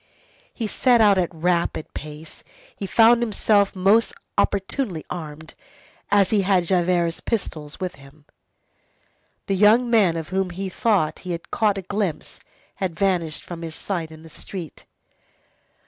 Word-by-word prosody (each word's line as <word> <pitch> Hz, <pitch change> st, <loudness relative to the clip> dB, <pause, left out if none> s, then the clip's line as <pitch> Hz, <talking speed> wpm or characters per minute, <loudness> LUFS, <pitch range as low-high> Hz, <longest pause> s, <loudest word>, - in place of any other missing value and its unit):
He 230 Hz, -, -4 dB
set 240 Hz, +3 st, +3 dB
out 205 Hz, -3 st, +5 dB
at 175 Hz, -, 0 dB
rapid 170 Hz, -1 st, -1 dB
pace. 155 Hz, +1 st, -9 dB, 0.3 s
He 195 Hz, -, -5 dB
found 230 Hz, +3 st, +5 dB
himself 210 Hz, -3 st, +2 dB
most 200 Hz, +5 st, +3 dB, 0.2 s
opportunely 195 Hz, -, -1 dB
armed, 160 Hz, -2 st, -7 dB, 0.6 s
as 200 Hz, -2 st, +3 dB
he 210 Hz, -2 st, +3 dB
had 190 Hz, -2 st, +2 dB
Javert's 175 Hz, -1 st, +1 dB
pistols 155 Hz, -9 st, -4 dB
with 185 Hz, -4 st, -4 dB
him. 140 Hz, +2 st, -18 dB, 1.2 s
The 195 Hz, -, -1 dB
young 220 Hz, +5 st, +4 dB
man 195 Hz, -8 st, +4 dB
of 160 Hz, -1 st, -5 dB
whom 190 Hz, 0 st, -1 dB
he 190 Hz, +2 st, -5 dB
thought 190 Hz, -5 st, +1 dB
that -, -, -14 dB
he 180 Hz, -1 st, -4 dB
had 170 Hz, -, -8 dB
caught 210 Hz, -2 st, +1 dB
a 195 Hz, -, -4 dB
glimpse, 195 Hz, -4 st, -3 dB, 0.4 s
had 185 Hz, -5 st, -3 dB
vanished 175 Hz, -5 st, 0 dB
from 170 Hz, -1 st, -8 dB
his 165 Hz, -1 st, -6 dB
sight 170 Hz, -5 st, -4 dB
in 160 Hz, 0 st, -13 dB
the 160 Hz, -, -12 dB
street. 170 Hz, +1 st, -9 dB
185 Hz, 150 wpm, -23 LUFS, 165-205 Hz, 1.2 s, out